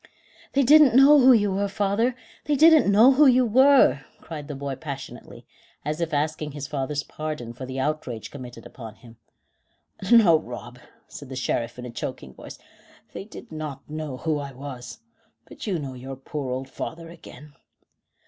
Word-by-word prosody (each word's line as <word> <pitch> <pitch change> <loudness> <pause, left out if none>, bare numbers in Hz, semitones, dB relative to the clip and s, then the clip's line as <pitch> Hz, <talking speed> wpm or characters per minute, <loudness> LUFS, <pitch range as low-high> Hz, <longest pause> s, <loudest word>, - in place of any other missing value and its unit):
"They 275 - +3
didn't 290 -1 +6
know 280 +3 +7
who 260 0 +7
you 205 -5 +3
were, 200 +1 -1
father; 205 +5 0 0.3
they 295 - +1
didn't 315 -6 +6
know 225 +6 +6
who 285 +2 +5
you 255 -1 +4
were," 255 - +5 0.2
cried 155 -3 -9
the 145 - -6
boy 140 0 -5
passionately, 140 -1 -9 0.4
as 155 +3 -3
if 165 0 -2
asking 150 0 -2
his 145 -1 -6
father's 140 0 -3
pardon 150 -8 -6
for 130 +2 -8
the 130 +1 -5
outrage 130 -5 -4
committed 125 -4 -10
upon 115 -4 -11
him. 115 -2 -17 0.9
"No, 195 -9 +6
Rob," 120 -2 -10 0.3
said 140 - -11
the 130 - -7
Sheriff, 120 -2 -3
in 125 - -8
a 125 - -7
choking 120 - -7
voice; - - -11 0.6
"they - - -7
did 210 - -12
not 150 -3 -7
know 150 -3 -6
who 155 +1 -2
I 140 -1 -7
was. 130 - -9 0.4
But - - -10
you 190 -4 0
know 140 -4 -6
your 130 +2 -8
poor 135 +1 -6
old 130 +1 -4
father 165 +4 -7
again." 150 -3 -14
150 Hz, 175 wpm, -24 LUFS, 130-205 Hz, 0.9 s, know